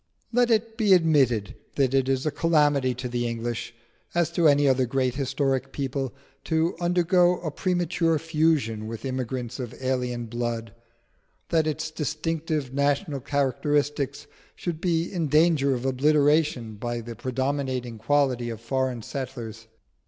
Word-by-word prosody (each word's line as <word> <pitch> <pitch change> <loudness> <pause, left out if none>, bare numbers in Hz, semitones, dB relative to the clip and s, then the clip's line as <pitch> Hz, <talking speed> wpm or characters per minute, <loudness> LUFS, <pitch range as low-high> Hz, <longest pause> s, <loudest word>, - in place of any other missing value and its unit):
Let 245 0 +3
it 225 0 +1
be 210 -3 +5
admitted 135 - +2 0.2
that 135 -2 +2
it 135 -1 +2
is 135 +1 0
a 155 - +1
calamity 145 -6 +2
to 125 +1 -4
the 120 0 -1
English, 115 0 -4 0.4
as 170 -1 +2
to 170 -1 +3
any 145 -1 +4
other 130 -1 +3
great 130 0 0
historic 135 0 -1
people, 135 -2 -3 0.3
to 160 +1 +1
undergo 175 0 +3
a 160 -3 -3
premature 175 -1 +1
fusion 150 -9 0
with 115 +1 -6
immigrants 130 -1 -3
of 125 -3 -5
alien 125 -2 -1
blood; 115 -1 -3 0.8
that 160 -2 +2
its 155 +1 -2
distinctive 155 -2 -2
national 140 +2 0
characteristics 140 +1 0 0.3
should 165 -2 -4
be 165 -3 +1
in 170 -4 0
danger 150 -2 +3
of 125 +1 -5
obliteration 145 -3 +2
by 120 +2 -3
the 115 0 -8
predominating 130 -1 -2
quality 125 -1 +1
of 115 -2 -5
foreign 130 0 -2
settlers. 115 -5 -6
135 Hz, 140 wpm, -26 LUFS, 125-160 Hz, 0.8 s, be